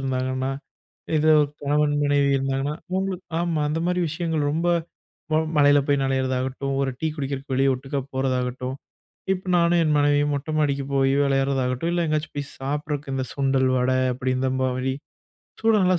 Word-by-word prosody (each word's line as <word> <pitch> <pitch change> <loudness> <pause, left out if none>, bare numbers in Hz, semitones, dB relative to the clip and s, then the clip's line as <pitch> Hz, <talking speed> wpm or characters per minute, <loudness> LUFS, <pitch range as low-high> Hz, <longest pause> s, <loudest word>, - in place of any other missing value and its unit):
இருந்தாங்கன்னா, 130 0 -1 0.7
இதோ 155 +1 +4
ஒரு 145 - 0
கணவன் 145 +1 +2
மனைவி 145 -1 +3
இருந்தாங்கன்னா, 135 +2 -1 0.2
அவுங்ளுக்கு 190 -1 -2
ஆமா, 170 -3 0
அந்த 155 +2 -1
மாரி 180 0 +1
விஷயங்கள் 160 -2 -1
ரொம்ப 165 +3 0 0.7
வ - - +3 0.2
மழைல 145 0 +6
போய் 140 -1 +3
நனையிறது 130 -1 0
ஆகட்டும், 135 +1 -3
ஒரு 135 -1 0
டீ 160 - 0
குடிக்கிறக்கு 140 -1 -4
வெளிய 135 +1 +3
ஒட்டுக்கா 135 +2 -4
போறதாகட்டும், 130 -1 -1 0.6
இப் 185 0 -7
நானும் 170 0 +3
என் 150 -2 +2
மனைவியும் 145 0 +3
மொட்ட 140 +2 -5
மாடிக்கு 140 -2 0
போய் 135 0 +3
விளையாட்றதாகட்டும், 135 +2 0
இல்ல 175 -1 +1
எங்கயாச்சும் 155 -1 -2
போய் 140 - -3
சாப்பிடறுதுக்கு 145 +1 -3
இந்த 130 - -1
சுண்டல், 135 -1 +2
வட 125 +1 +1 0.2
அப்டி 130 +1 -1
இந்த 130 0 0
மாரி 130 0 0 0.7
சூட 225 0 +3
நல்லா 180 -1 +3
140 Hz, 160 wpm, -24 LUFS, 130-150 Hz, 0.7 s, மழைல